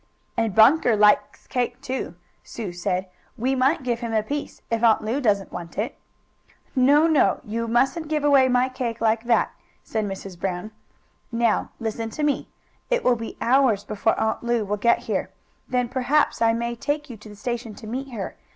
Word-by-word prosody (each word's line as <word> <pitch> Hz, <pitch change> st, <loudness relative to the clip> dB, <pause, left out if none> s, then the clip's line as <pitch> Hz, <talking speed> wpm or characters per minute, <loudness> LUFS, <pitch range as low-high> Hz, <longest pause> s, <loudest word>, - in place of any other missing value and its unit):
"And 225 Hz, -4 st, 0 dB
Bunker 240 Hz, +1 st, +6 dB
likes 210 Hz, 0 st, +3 dB
cake, 245 Hz, -1 st, -2 dB
too," 255 Hz, -9 st, -4 dB, 0.3 s
Sue 210 Hz, -6 st, -6 dB
said. 180 Hz, +2 st, -2 dB, 0.3 s
"We 255 Hz, +4 st, 0 dB
might 265 Hz, +3 st, +2 dB
give 240 Hz, -2 st, -1 dB
him 235 Hz, -2 st, -4 dB
a 215 Hz, -, +2 dB
piece, 285 Hz, +6 st, -5 dB
if 230 Hz, -1 st, 0 dB
Aunt 225 Hz, -2 st, +4 dB
Lu 235 Hz, +7 st, -1 dB
doesn't 205 Hz, -5 st, +1 dB
want 170 Hz, -2 st, -8 dB
it." 215 Hz, +4 st, -2 dB, 0.8 s
"No, 280 Hz, +4 st, +5 dB
no! 300 Hz, -, +3 dB
You 230 Hz, +2 st, -3 dB
musn't 270 Hz, +8 st, +1 dB
give 305 Hz, -1 st, -1 dB
away 280 Hz, -3 st, +5 dB
my 250 Hz, 0 st, +3 dB
cake 250 Hz, -3 st, -4 dB
like 225 Hz, +1 st, +1 dB
that," 235 Hz, -1 st, +2 dB, 0.3 s
said 220 Hz, -1 st, -2 dB
Mrs. 195 Hz, -2 st, -7 dB
Brown. 185 Hz, +3 st, -3 dB, 0.6 s
"Now 230 Hz, -2 st, +1 dB
listen 225 Hz, 0 st, -3 dB
to 305 Hz, -, -1 dB
me. 295 Hz, -1 st, 0 dB, 0.4 s
It -, -, +1 dB
will 250 Hz, -, +4 dB
be 230 Hz, -1 st, -7 dB
hours 245 Hz, -5 st, +3 dB
before 210 Hz, +1 st, 0 dB
Aunt 220 Hz, -, 0 dB
Lu 235 Hz, -2 st, 0 dB
will 205 Hz, +1 st, -1 dB
get 235 Hz, +3 st, +3 dB
here. -, -, -1 dB, 0.4 s
Then, 250 Hz, -1 st, +1 dB
perhaps, 260 Hz, +3 st, +1 dB
I 225 Hz, 0 st, +5 dB
may 235 Hz, +1 st, -2 dB
take 290 Hz, +5 st, -2 dB
you 240 Hz, -, -9 dB
to 210 Hz, +1 st, -13 dB
the 205 Hz, -, -11 dB
station 230 Hz, 0 st, -4 dB
to -, -, -11 dB
meet 260 Hz, +5 st, -4 dB
her. 215 Hz, -6 st, -5 dB
235 Hz, 190 wpm, -24 LUFS, 215-260 Hz, 0.8 s, Bunker